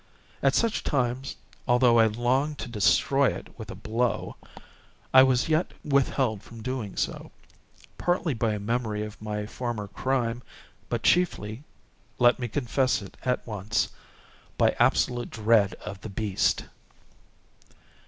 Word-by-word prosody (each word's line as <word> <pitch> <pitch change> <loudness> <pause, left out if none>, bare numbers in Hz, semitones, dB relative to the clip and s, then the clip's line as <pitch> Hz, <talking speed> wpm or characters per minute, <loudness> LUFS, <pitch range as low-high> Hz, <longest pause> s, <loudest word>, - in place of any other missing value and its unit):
At 135 0 +3
such 230 -2 +1
times, 130 0 -1 0.3
although 120 -1 +5
I 115 - +6
longed 130 +7 0
to - - -5
destroy 135 +5 +3
it - - -5
with 110 - -8
a - - -6
blow, 110 +2 -2 0.8
I 130 - +10
was 130 -2 +3
yet 160 +2 0
withheld 135 -6 +1
from 115 - -13
so - - -9
doing, 125 -6 -4 1.0
partly 175 -3 +1
by 115 -2 0
a 105 - -3
memory 110 0 -1
of 105 0 -9
my 105 -1 -3
former 115 -2 -4
crime, 120 0 -1 0.5
but - - -2
chiefly—let 120 - 0
me 120 - -2
confess 130 -1 0
it 100 - -12
at 125 -1 -1
once—by 105 -2 -3
absolute 120 -1 +2
dread 110 -2 +2
of 100 -2 -9
the - - -7
beast. 95 -1 0
120 Hz, 130 wpm, -27 LUFS, 105-130 Hz, 1.0 s, I